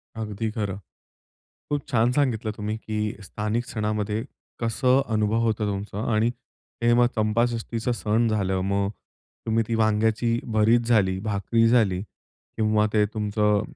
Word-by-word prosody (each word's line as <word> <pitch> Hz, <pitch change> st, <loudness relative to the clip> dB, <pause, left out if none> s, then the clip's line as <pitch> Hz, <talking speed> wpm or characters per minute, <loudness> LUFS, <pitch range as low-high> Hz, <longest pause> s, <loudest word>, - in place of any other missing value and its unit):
अगदी 110 Hz, 0 st, -3 dB
खरं. 100 Hz, -3 st, -3 dB, 0.9 s
खूप 145 Hz, -1 st, -2 dB
छान 120 Hz, -1 st, +3 dB
सांगितलं 120 Hz, -6 st, 0 dB
तुम्ही, 105 Hz, +1 st, -3 dB
की 105 Hz, -1 st, -3 dB
स्थानिक 105 Hz, +4 st, -2 dB
सणामध्ये 105 Hz, 0 st, -2 dB, 0.4 s
कसं 125 Hz, +3 st, +2 dB
अनुभव 110 Hz, +1 st, +1 dB
होतं 110 Hz, -1 st, 0 dB
तुमचा. 100 Hz, +1 st, -4 dB
आणि 110 Hz, +2 st, +3 dB, 0.6 s
हे 120 Hz, -, +5 dB
मग 120 Hz, 0 st, +5 dB
चंपाषष्टीचं 115 Hz, +2 st, 0 dB
सण 115 Hz, 0 st, +1 dB
झालं 95 Hz, -3 st, 0 dB
मग. 100 Hz, +1 st, 0 dB, 0.6 s
तुम्ही 115 Hz, +1 st, +2 dB
ती 115 Hz, -, 0 dB
वांग्याची 110 Hz, +1 st, +2 dB
भरीत 110 Hz, +2 st, +4 dB
झाली, 95 Hz, -5 st, +3 dB
भाकरी 110 Hz, +3 st, +1 dB
झाली. 110 Hz, -6 st, +3 dB, 0.6 s
किंवा 110 Hz, -1 st, +2 dB
ते 105 Hz, -1 st, +4 dB
तुमचं 105 Hz, -1 st, +1 dB
110 Hz, 130 wpm, -25 LUFS, 105-115 Hz, 0.9 s, हे